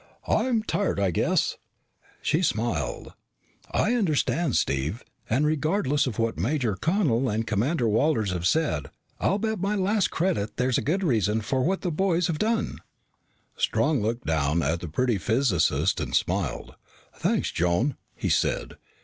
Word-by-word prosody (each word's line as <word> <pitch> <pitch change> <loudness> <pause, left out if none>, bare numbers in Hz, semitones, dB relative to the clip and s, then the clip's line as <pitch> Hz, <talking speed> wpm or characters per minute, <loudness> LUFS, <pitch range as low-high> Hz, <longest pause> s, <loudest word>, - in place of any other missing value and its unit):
"I'm 235 -4 +1
tired 205 - -1
I 100 -2 +2
guess." - - +1 0.7
She 160 - +2
smiled. 110 - -1 0.6
"I 230 - +1
understand, 170 - +1
Steve, 70 - 0 0.3
and 130 +7 +2
regardless 155 -1 +1
of 115 - -4
what 115 -6 -1
Major 120 - 0
Connel 135 - +1
and 110 +2 -1
Commander 120 +5 0
Walters 110 -2 +2
have 90 0 -1
said, 95 - +1 0.3
I'll 195 - +1
bet 220 -1 -2
my 200 +3 0
last 200 0 +1
credit 110 - -1
there's 125 +1 +1
a - - -3
good 185 +6 0
reason 110 - +2
for 130 +5 -1
what 190 +8 0
the 180 - -1
boys 175 +1 +1
have 160 -3 -1
done." 225 +1 0 0.8
Strong 150 -5 +1
looked 115 +3 -2
down 80 +1 +1
at 80 +4 0
the 90 - -6
pretty 115 +6 0
physicist 110 - +1
and - - -2
smiled. - - -1 0.4
"Thanks, - - 0
Joan," 90 - +1 0.2
he - - -2
said. - - 0
130 Hz, 150 wpm, -26 LUFS, 105-170 Hz, 0.8 s, I